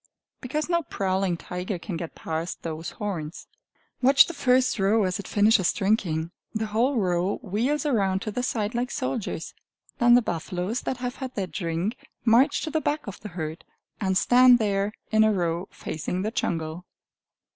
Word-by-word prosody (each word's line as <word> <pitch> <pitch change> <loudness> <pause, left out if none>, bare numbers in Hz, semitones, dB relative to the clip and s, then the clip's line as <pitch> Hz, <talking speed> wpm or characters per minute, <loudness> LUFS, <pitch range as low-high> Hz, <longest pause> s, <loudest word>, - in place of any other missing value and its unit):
Because 300 +4 -2
no 340 -1 +2
prowling 190 - -1
tiger 180 +3 -4
can 175 +2 -6
get 165 0 -6
past 160 +1 -4
those 160 0 -4
horns. 175 -6 -4 0.6
Watch 275 +2 +7
the 340 - -6
first 255 -4 +2
row 205 +3 +3
as 185 0 -1
it 200 - -7
finishes 205 -3 +4
drinking; 175 -6 0 0.2
the 220 0 0
whole 235 +6 +1
row 180 -1 +1
wheels 245 - 0
around 195 -8 +1
to 215 - -3
the 250 - -2
side 220 -4 -1
like 245 +1 -1
soldiers. 255 - -3 0.5
Then 240 0 +7
the 245 - +5
buffaloes 180 +6 -2
that 260 - -2
have 250 +1 -4
had 260 -2 -6
their 195 - -1
drink 170 +5 -3 0.3
march 250 +6 +4
to 315 - -3
the 315 - 0
back 300 +1 -1
of 200 - -7
the 210 - -8
herd, 160 -2 -5 0.4
and 190 -3 +1
stand 250 +2 +6
there 200 -2 0 0.2
in 220 0 +5
a 220 - +4
row 175 -1 -1
facing 180 +4 -4
the 215 - -1
jungle. 165 -4 -2
205 Hz, 175 wpm, -26 LUFS, 180-245 Hz, 0.6 s, Watch